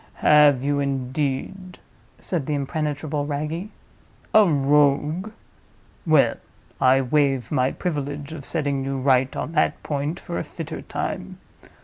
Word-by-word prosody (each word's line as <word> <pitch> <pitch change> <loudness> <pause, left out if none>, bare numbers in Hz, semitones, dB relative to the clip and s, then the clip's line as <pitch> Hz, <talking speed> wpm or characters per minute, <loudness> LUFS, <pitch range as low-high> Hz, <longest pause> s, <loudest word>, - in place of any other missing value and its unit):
"Have 145 -3 +6
you, 145 0 +1
indeed?" 140 +7 -3 0.4
said 165 -7 -3
the 150 - 0
impenetrable 145 0 -2
Wragge. 155 +6 -3 0.6
"A 215 -1 +7
Rogue? 150 +5 +2 0.8
Well, 155 -3 +4 0.4
I 130 +1 +5
waive 135 -2 +1
my 130 -3 +2
privilege 145 -3 -4
of 150 -3 -8
setting 140 -3 -1
you 135 0 -2
right 130 0 +2
on - - -4
that 160 -2 0
point 145 +2 -2
for 170 - -5
a - - -3
fitter 160 -2 -7
time. - - -5
145 Hz, 125 wpm, -23 LUFS, 135-155 Hz, 0.8 s, A